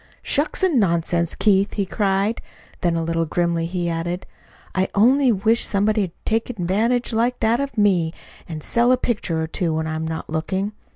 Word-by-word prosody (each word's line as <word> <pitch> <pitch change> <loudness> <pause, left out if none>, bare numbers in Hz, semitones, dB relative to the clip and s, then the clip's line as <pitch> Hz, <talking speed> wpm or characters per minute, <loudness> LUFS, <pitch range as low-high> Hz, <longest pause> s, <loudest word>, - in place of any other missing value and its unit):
"Shucks 300 +6 0
and 340 -9 +3
nonsense, 170 -3 +1
Keith!" 200 -1 +2
he 200 - -1
cried. 200 +3 0 0.4
Then 175 -2 +1
a 165 - -1
little 165 0 0
grimly 170 0 0
he 175 0 -2
added: 170 +2 -3 0.5
"I 190 0 +1
only 255 +5 +4
wish 225 +3 +2
somebody'd 205 -2 +1
take 225 +2 0
advantage 225 +4 0
like 235 +3 +1
that 225 +2 +2
of 280 -3 -4
me, 185 -6 +3 0.4
and 155 -2 -6
sell 240 +1 +2
a 255 - +4
picture 205 -10 -2
or 160 - 0
two 165 0 -1
when 160 0 -1
I'm 160 0 -3
not 160 0 -5
looking. 190 +6 -2
195 Hz, 175 wpm, -22 LUFS, 170-225 Hz, 0.5 s, only